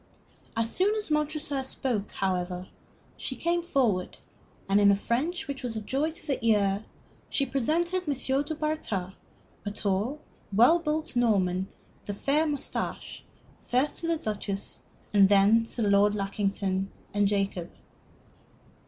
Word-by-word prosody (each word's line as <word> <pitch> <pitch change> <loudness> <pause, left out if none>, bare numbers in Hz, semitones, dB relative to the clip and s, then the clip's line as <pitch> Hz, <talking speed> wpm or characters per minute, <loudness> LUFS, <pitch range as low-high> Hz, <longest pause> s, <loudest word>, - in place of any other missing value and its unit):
As 230 +9 0 0.3
Montresor 300 -2 0
spoke, 245 -5 -1
however, 180 -1 -2 0.5
she - - -4
came 345 0 0
forward, 245 - 0 0.5
and 200 +1 +4
in 200 - +7
a - - +5
French 275 - -1
which 280 -1 -4
was 245 -3 -4
a - - -1
joy 275 +8 0
to 325 - -9
the 275 -6 -2
ear, 205 -2 +2 0.4
she 275 - +1
presented 335 +8 0
M. 290 - +2 0.3
du 300 +2 -4
Bartas, 295 -12 -2 0.5
a 205 - -2
tall, 210 +7 -1 0.3
well 240 - +6
built 310 -3 -2
Norman 190 -6 +2 0.3
with 205 -1 -6
a - - -19
fair 300 +3 +2
mustache, 290 -2 -3 0.4
first 260 +4 0
to 335 - -2
the 335 -1 +1
Duchess 205 -5 -4 0.3
and 200 -2 +6
then 205 +3 +5
to 225 -2 -1
Lord 205 +1 +4
Lackington 195 -1 -1 0.2
and 205 0 +3
Jacob. 195 -4 -1
225 Hz, 135 wpm, -28 LUFS, 200-295 Hz, 0.5 s, in